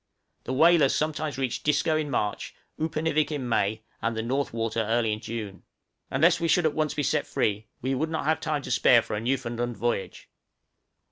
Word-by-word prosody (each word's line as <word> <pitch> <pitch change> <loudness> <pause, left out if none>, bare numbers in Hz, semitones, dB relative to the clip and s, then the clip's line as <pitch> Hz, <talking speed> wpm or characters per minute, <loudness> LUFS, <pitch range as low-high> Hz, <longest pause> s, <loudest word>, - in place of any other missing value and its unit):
The 130 - -3
whalers 160 0 +5
sometimes 155 -2 -2
reach 130 -3 -2
Disco 150 +2 +2
in 155 -1 -1
March, 105 -6 -2 0.2
Upernivik 155 0 0
in 140 -4 -3
May, 110 -1 0 0.2
and 115 0 -1
the 110 - -1
North 135 +4 -1
Water 115 0 -2
early 115 0 +1
in 105 - -4
June. 110 -4 -6 0.5
Unless 165 +7 +3
we 170 - 0
should 175 +2 +3
be 155 - +4
at 145 - -10
once 155 -1 0
set 150 -2 0
free, 105 0 -1 0.2
we 130 +1 0
would 155 +5 -1
not 160 -2 -3
have 155 +1 +2
time 150 -3 -2
to - - -6
spare 120 -2 +5
for - - -4
a 105 - -3
Newfoundland 120 -1 -2
voyage. 120 -5 -3
130 Hz, 195 wpm, -26 LUFS, 115-155 Hz, 0.5 s, whalers